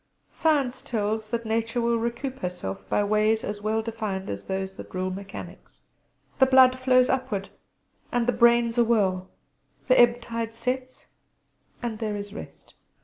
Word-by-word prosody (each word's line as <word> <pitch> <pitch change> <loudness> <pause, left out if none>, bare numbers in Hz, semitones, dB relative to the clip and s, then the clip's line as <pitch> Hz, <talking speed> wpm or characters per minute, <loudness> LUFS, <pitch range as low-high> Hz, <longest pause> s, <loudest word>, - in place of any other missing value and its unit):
Science 285 -6 +1
tells 215 -1 -2
that 230 0 -2
Nature 225 +2 -1
will 235 0 +1
recoup 240 +3 -3
herself 95 - -5
by 205 - +2
ways 215 +2 +2
as 205 0 -4
well 220 +1 0
defined 215 -4 -4
as 100 0 -7
those 190 0 -3
that - - -10
rule 185 0 -1
mechanics. 195 +1 -9 0.6
The 265 - +6
blood 260 -1 +6
flows 255 -1 +4
upward 255 -7 -1 0.6
and 240 -1 +1
the 245 - +2
brain's 235 0 +4
awhirl; 200 -6 +2 0.6
the 255 - +5
ebb 240 0 +6
tide 230 -1 -4
sets 255 +2 -4 0.7
and 225 -3 -3
there 215 -2 -2
is 205 0 -6
rest. - - -11
230 Hz, 150 wpm, -26 LUFS, 205-245 Hz, 0.7 s, The